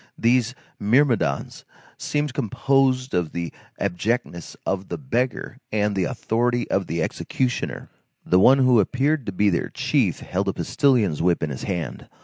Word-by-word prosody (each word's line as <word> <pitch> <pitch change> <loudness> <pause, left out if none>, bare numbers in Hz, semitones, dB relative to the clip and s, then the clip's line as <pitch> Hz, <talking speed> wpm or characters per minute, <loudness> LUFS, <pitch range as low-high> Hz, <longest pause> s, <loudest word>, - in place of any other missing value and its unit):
These 120 +1 +2 0.2
myrmidons 115 - +1 0.3
seemed 145 -2 -2
composed 135 0 +1
of 90 -3 -1
the 85 -3 -4 0.3
abjectness 100 -1 -2
of 95 0 -2
the - - -4
beggar 130 -1 -2
and 105 -1 0
the 95 - +1
authority 120 -1 0
of 95 -1 0
the 85 0 -1
executioner. 125 +8 -2 0.4
The 90 - +4
one 130 +8 +7
who 130 -3 +5
appeared 135 +6 +1
to - - -1
be 100 +2 +2
their 85 - -1
chief - - 0
held 95 +2 -2
a 95 - +1
postilion's 120 - +1
whip 85 -1 +2
in 75 - -1
his 65 - -6
hand. 90 -5 -4
110 Hz, 150 wpm, -23 LUFS, 90-130 Hz, 0.4 s, one